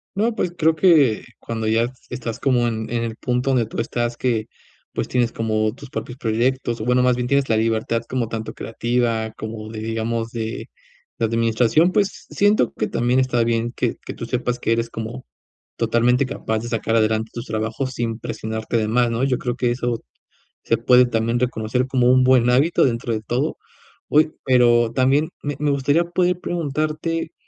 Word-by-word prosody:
No, 225 +3 +1
pues, 180 -5 -1
creo 160 0 +3
que 150 - +4 0.2
cuando 110 -1 -4
ya 115 +2 +2 0.2
estás 120 -2 -5
como 125 -3 +2
en 110 -1 -3
en 115 0 -1
el 115 -1 -4
punto 125 +2 0
donde 120 -4 +2
tú - - -6
estás, 120 0 -2
que, 115 -4 0 0.5
pues, - - -2
tienes 120 -2 +1
como 110 -1 0
tus 140 -1 -12
propios 125 0 -5
proyectos, 120 0 0
o - - -3
bueno, 125 0 +3
más 125 -1 +3
bien, 125 0 -2
tienes 140 -1 +1
la 110 - +3
libertad 115 0 0
como 125 -3 -1
tanto 110 -1 -5
creativa 115 -1 -1
como 110 0 -6
de, 110 - -6
digamos, 115 +1 -2
de 115 -1 -5 0.5
de 115 - +2
administración, 115 +8 +2
pues, 200 0 0
siento 205 - +2
que 110 - -1
también 120 +2 +1
está 125 -3 +2
bien 115 0 0
que 120 - -1
que - - -5
tú 115 - -6
sepas 125 0 -1
que 115 - -1
eres 115 0 0
como 115 +3 -6 0.5
totalmente 120 +3 +2
capaz 110 -4 -3
de 120 +1 -6
sacar 115 0 -1
adelante 110 0 +1
tus 120 +2 -6
trabajos 115 +4 -2
sin 115 -1 -3
presionarte 110 +1 -3
de 110 -1 0
más, 120 +1 +2
¿no?, 115 +3 -1
yo 130 -2 +2
creo 120 -1 -2
que 120 -1 0
eso 120 -1 -2 0.6
se - - +1
puede 125 0 +5
también 115 0 0
reconocer 125 +1 -1
como 125 -1 +3
un 130 0 +5
buen 125 -2 +4
hábito, 140 +7 +3
dentro 115 -2 -1
de 110 - -2
todo. 125 +8 -2 0.5
Uy, 155 +1 +3
pero 120 -3 +4
también 140 +5 +2
me 145 -1 -2
me 150 -1 +1
gustaría 145 +4 +2
poder 180 +1 0
preguntarte 160 +1 -2
120 Hz, 190 wpm, -21 LUFS, 115-130 Hz, 0.6 s, puede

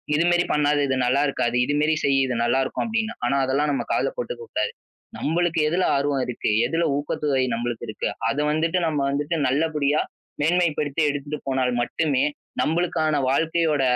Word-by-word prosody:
இது 160 - +3
மாரி 175 0 +3
பண்ணாதே, 150 -1 +2
இது 130 - 0
நல்லாருக்காது, 130 -2 +1
இது 145 - -1
மாதிரி 155 +1 +2
செய் 140 -1 +3
இது 125 -2 -2
நல்லா 120 +3 +2
இருக்கும் 130 - -3
அப்படின்னா. 225 0 -2
ஆனா 130 +3 +1
அதெல்லாம் 140 +3 +1
நம்ம - - -1
காதுல - - +1
போட்டுக்கக் 475 -2 -6
கூடாது - - -1 0.5
நம்பளுக்கு 170 +1 0
எதுல 175 +4 +1
ஆர்வம் 140 -1 0
இருக்கு, 125 -3 -2 0.2
எதுல 165 +7 0
ஊக்கத்தொகை 145 -1 0
நம்மளுக்கு 120 0 -3
இருக்கு, - - -3 0.2
அதை 145 - 0
வந்துட்டு 165 +4 +1
நம்ம 150 -2 -1
வந்துட்டு 145 +4 -1
நல்லபடியா 150 +1 +1 0.4
மேன்மைப்படுத்தி 160 -2 +1
எடுத்துட்டு 145 +1 -4
போனால் 130 -1 +1
மட்டுமே 140 +1 0 0.4
நம்மளுக்கான 155 -3 +1
வாழ்க்கையோட 160 +1 +1
150 Hz, 160 wpm, -23 LUFS, 135-165 Hz, 0.5 s, இது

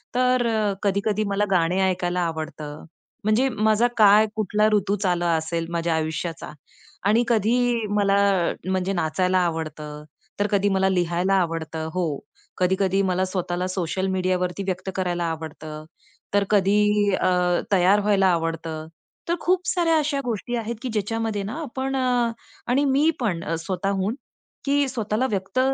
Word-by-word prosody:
तर 250 0 +3
अ, 215 -3 +1
कधी-कधी 205 +1 +1
मला 200 +1 +1
गाणे 180 +1 +2
ऐकायला 180 -1 -1
आवडतं, 155 -2 -6 0.4
म्हणजे 220 +6 +2
माझा 220 0 +2
काय 210 0 +7
कुठला 210 0 +1
ऋतूच 200 0 +1
आला 175 -1 +1
असेल 165 +1 -3
माझ्या 170 -1 0
आयुष्याचा. 160 +1 -3 0.6
आणि 225 +4 +4
कधी 230 +1 +2 0.4
मला 200 -1 +3
अ, 180 -4 +1 0.2
म्हणजे 190 +1 0
नाचायला 185 +2 +1
आवडतं, 155 -2 -5 0.4
तर 205 - +2
कधी 200 0 +2
मला 190 0 +2
लिहायला 180 +1 +1
आवडतं. 160 -1 -3
हो. 165 -6 -1 0.4
कधी-कधी 190 +1 +2
मला 185 0 +1
स्वतःला 180 -1 -2
सोशल 185 0 -2
मीडियावरती 185 0 -1
व्यक्त 185 0 -3
करायला 175 -2 -1
आवडतं, 155 -1 -6 0.5
तर 205 0 +3
कधी 205 +1 +3
अ, 180 -1 +1
तयार 190 +2 +5
व्हायला 200 -2 +3
आवडतं. 165 -2 -2 0.4
तर 340 - +2
खूप 365 0 +1
साऱ्या 335 -3 +2
अशा 290 -2 -1
गोष्टी 240 +1 -3
आहेत, 230 +1 -3
की 260 - -3
ज्याच्यामध्ये 220 0 -1
ना 205 +4 -5
आपण 270 -1 -3
अ, 250 -3 +1 0.4
आणि 275 +3 +3
मी 280 +3 +3
पण 185 -9 -1
अ, 165 - -2
स्वतःहून 195 +4 -2 0.5
की 285 0 +2
स्वतःला 225 0 -1
व्यक्त 195 +5 -2
190 Hz, 145 wpm, -24 LUFS, 175-215 Hz, 0.6 s, काय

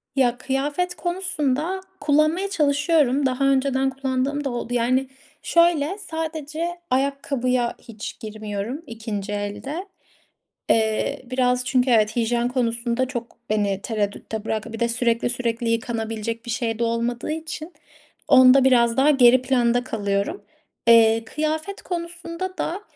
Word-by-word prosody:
Ya, 250 -3 +2
kıyafet 290 +8 -1
konusunda 345 -1 -1 0.2
kullanmaya 310 +6 +2
çalışıyorum. 290 -4 +2
Daha 260 +1 0
önceden 270 0 +2
kullandığım 270 +2 -2
da 275 - -1
oldu. 240 -1 -4
Yani, 255 +2 +1 0.4
şöyle 335 0 +3
sadece 320 -3 -4 0.2
ayakkabıya 255 -2 0
hiç 225 -2 -8
girmiyorum 215 +4 -5
2'nci 220 -3 -5
elde. 205 - -4 0.8
Eee, 220 -1 +1
biraz 250 0 +1
çünkü 255 0 +2
evet 220 -2 +3
hijyen 235 0 +1
konusunda 240 0 0
çok 240 -2 -6
beni 205 -2 0
tereddütte 215 0 -3
bıraktı. 220 +1 -3
Bir 225 - -6
de 235 - +1
sürekli 235 0 +1
sürekli 235 -1 -1
yıkanabilecek 230 0 -2
bir 235 - -4
şey 230 -2 -2
de - - +1
olmadığı 235 +3 -1
için 315 +1 -6 0.5
onda 260 0 +7
biraz 240 -2 +4
daha 275 +3 +5
geri 255 -3 +6
planda 245 -2 +2
kalıyorum. 205 - -2 0.4
Eee, 225 -1 +6
kıyafet 310 - -3
konusunda 345 +1 -5
da 360 +5 -3
255 Hz, 125 wpm, -23 LUFS, 230-295 Hz, 0.8 s, onda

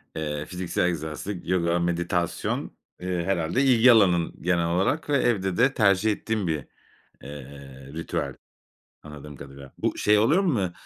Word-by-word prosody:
eee, 75 -1 -3
fiziksel 90 0 -2
egzersiz, 85 +3 -4
yoga, 85 -1 +1
meditasyon, 85 0 -2 0.2
eee, 90 -1 -2
herhâlde 90 +6 0
ilgi 125 -2 +6
alanın 90 -7 +3
genel 85 -1 +1
olarak 95 - 0
ve 145 - +3
evde 95 -8 0
de 135 +4 +3
tercih 105 -1 +3
ettiğin 105 -2 -2
bir, 75 -4 -2 0.6
eee, 70 -1 -11
ritüel 80 +1 -3 0.7
anladığım 75 -1 -10
kadarıyla. 70 0 -12
Bu, - - -1
şey 105 0 +4
oluyor 145 - +3
mu 110 - 0
90 Hz, 140 wpm, -25 LUFS, 80-105 Hz, 0.7 s, ilgi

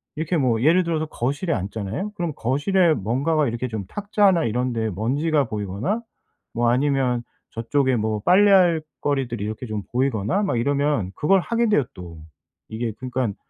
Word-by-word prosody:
이렇게 160 +2 -1
뭐 125 -5 +1
예를 170 +5 +4
들어서 160 -2 -1
거실에 145 +4 -2
앉잖아요? 110 - -4
그럼 175 -5 -3
거실에 160 - +2
뭔가가 140 +9 0
이렇게 120 +2 -3
좀 110 -5 -5
탁자나 200 - +2
이런 125 +3 -1
데에 110 -1 -1
먼지가 140 - 0
보이거나 105 - -3 0.5
뭐 120 0 +1
아니면 130 -2 +1 0.3
저쪽에 130 +3 0
뭐 110 -2 -1
빨래할 185 -4 +5 0.2
거리들이 130 -7 -1
이렇게 110 +4 -5
좀 105 -2 -4
보이거나 125 - 0
막 195 - 0
이러면 140 -5 0
그걸 190 - +2
하게 235 +3 0
돼요 205 -9 +3
또. 85 -3 -10 0.5
이게 115 +1 -3
그러니깐 125 -3 -3
130 Hz, 365 characters per minute, -23 LUFS, 115-165 Hz, 0.5 s, 빨래할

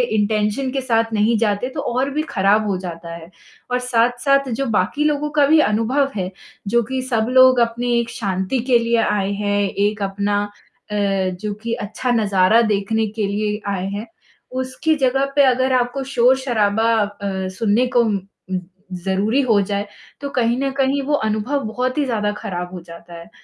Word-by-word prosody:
Intention 210 +4 0
के 270 -1 -2
साथ 230 -2 +1
नहीं 220 +2 +2
जाते, 215 +2 0
तो - - -6
और 255 +3 -1
भी 300 +2 -1
खराब 205 +3 +2
हो 195 - 0
जाता 170 -2 -7
है 165 0 -11 0.4
और 250 - +1
साथ-साथ 250 +3 +1
जो 275 - 0
बाकी 290 +11 0
लोगों 300 0 0
का 290 - +6
भी 315 +2 +5
अनुभव 250 +4 +2
है, 185 -2 -3 0.4
जो 235 +3 +2
कि 260 +4 -3
सब 225 -3 +1
लोग 255 0 +6
अपनी 240 +1 0
एक 235 - -2
शांति 195 +1 -2
के 240 - +7
लिए 235 0 +1
आए 200 -1 0
हैं, 205 0 0
एक 205 +2 -1
अपना 200 +1 0 0.5
अ, 210 - -2
जो 195 0 -1
कि 235 - -2
अच्छा 235 +2 -3
नज़ारा 210 -1 +3
देखने 215 +2 0
के 210 - +1
लिए 210 +1 -2
आए 190 -1 -2
हैं, 205 +3 -5 0.4
उसकी 260 +5 -1
जगह 270 -1 +1
पे 285 - +6
अगर 260 +1 +2
आपको 245 +3 -2
शोर-शराबा 235 -3 +2
अ, 200 -2 -4
सुनने 225 +4 +2
को 240 - +6
उम, 215 -4 0 0.7
ज़रूरी 195 +8 0
हो 225 -6 +3
जाए, 200 +1 -2 0.3
तो 280 - -4
कहीं 240 -3 +1
न 275 - 0
कहीं 275 +1 +1
वो 295 - 0 0.2
अनुभव 245 +7 -1
बहुत 250 +5 -2
ही 295 - +2
ज़्यादा 210 -5 -1
खराब 180 -1 -5
हो 180 - -6
जाता 170 0 -13
है। 170 - -13
225 Hz, 180 wpm, -20 LUFS, 200-255 Hz, 0.7 s, के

